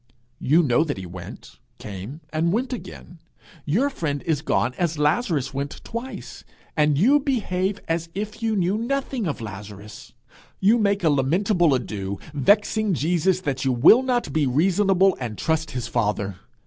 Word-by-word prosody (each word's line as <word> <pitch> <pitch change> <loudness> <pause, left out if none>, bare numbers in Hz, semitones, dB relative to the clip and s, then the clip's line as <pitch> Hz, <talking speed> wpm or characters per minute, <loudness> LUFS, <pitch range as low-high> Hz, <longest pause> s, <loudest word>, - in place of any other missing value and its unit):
You 160 +6 +3
know 140 +1 +3
that 155 -9 -3
he 95 - -6
went, 90 0 -10 0.2
came, 105 - -8
and 165 +2 +1
went 250 +6 -1
again. 175 -7 -9 0.5
Your 235 - +1
friend 145 - -3
is 155 -4 0
gone 125 -5 0
as 170 -3 0
Lazarus 150 - 0
went 140 +1 -4
twice, 235 +3 -7 0.3
and 150 -2 +3
you 260 - +5
behave 200 -8 -1
as 165 0 -2
if 210 +2 -5
you 225 -1 0
knew 190 +2 +1
nothing 260 -2 -2
of 145 - -3
Lazarus. 105 0 -9 0.5
You 215 +5 +4
make 200 -2 +1
a 160 - +4
lamentable 170 +3 +2
ado, 100 -5 -4 0.2
vexing 205 - +2
Jesus 175 +5 +1
that 135 -7 -2
you 135 - +2
will 140 - +6
not 250 -2 -1
be 155 -3 +2
reasonable 190 +6 +3
and 115 -5 -5
trust 160 0 -1
his 125 -3 -4
father! 105 -4 -1
165 Hz, 160 wpm, -23 LUFS, 130-205 Hz, 0.5 s, will